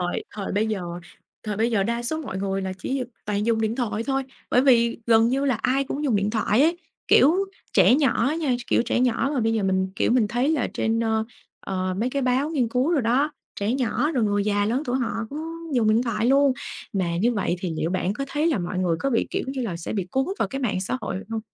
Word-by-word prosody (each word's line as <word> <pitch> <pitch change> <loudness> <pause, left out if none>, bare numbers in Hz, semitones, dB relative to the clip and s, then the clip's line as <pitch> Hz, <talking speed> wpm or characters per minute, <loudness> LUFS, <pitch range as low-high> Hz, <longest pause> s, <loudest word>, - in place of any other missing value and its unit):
Thời 180 0 -2
thời 200 -2 -4
bây 210 +2 +1
giờ 215 -4 -2 0.6
thời 210 -2 -3
bây 225 +2 +1
giờ 215 -4 +2
đa 235 +4 -1
số 315 +7 -2
mọi 225 -10 -5
người 195 0 -2
là 190 0 -3
chỉ 260 +7 -2
d - - -16 0.2
toàn 210 0 -1
dùng 230 -1 +2
điện 220 0 0
thoại 230 -4 -1
thôi, 270 0 0 0.3
bởi 250 - +5
vì 235 -3 +4
gần 225 0 +5
như 270 +2 0
là 270 -3 +2
ai 275 +2 +2
cũng 285 +2 -4
dùng 250 -7 +2
điện 200 +1 0
thoại 220 +2 +2
ấy. 330 +3 +3 0.3
Kiểu, 300 +6 +6 0.4
trẻ - - +6
nhỏ 270 -5 +2
á 305 - 0
nha, 300 -6 0
tr - - -7
kiểu, - - +3
trẻ 240 0 0
nhỏ 250 +2 +1
mà 255 - +1
bây 225 0 +1
giờ 220 -2 0
mình, 190 0 +1
kiểu, - - +1
mình 235 -4 +3
thấy 245 +4 0
là 305 -6 0
trên, 225 +1 0
ơ, 220 -1 +1 0.4
ờ, 185 -1 -2
mấy 240 +4 0
cái 275 +1 -1
báo 260 +4 +1
nghiên 265 -7 +1
cứu 250 +6 +1
rồi 310 -7 +2
đó, 265 +6 +2 0.3
trẻ 205 +3 +1
nhỏ, 265 +3 0
rồi 250 -7 +1
người 205 -1 +1
già 205 -1 +1
lớn 245 +6 0
tuổi 250 +1 -1
họ 240 -3 -1 0.2
cũng 290 - -5 0.4
dùng 230 -4 +3
điện 220 +2 +4
thoại 230 -2 -1
luôn. 275 +1 +4 0.4
Mà 180 -4 -1
như 230 +8 +2
vậy 195 -5 -1
thì 185 - -3
liệu 160 - -1
bạn 185 +1 0
có 275 +7 -4
thấy 295 +3 0
là 320 -8 +2
mọi 180 +1 -3
người 175 -3 +1
có 275 - 0
bị 230 - +1
kiểu - - -2
như 265 -1 -3
là, 195 -8 -3
sẽ 170 - -5
bị 195 -4 -2
cuốn 265 +5 +1
vào - - 0
cái 270 - -4
mạng 220 -8 -1
xã 190 +7 -2
hội - - -3
hông? 225 -1 -2
230 Hz, 265 wpm, -24 LUFS, 205-265 Hz, 0.6 s, Kiểu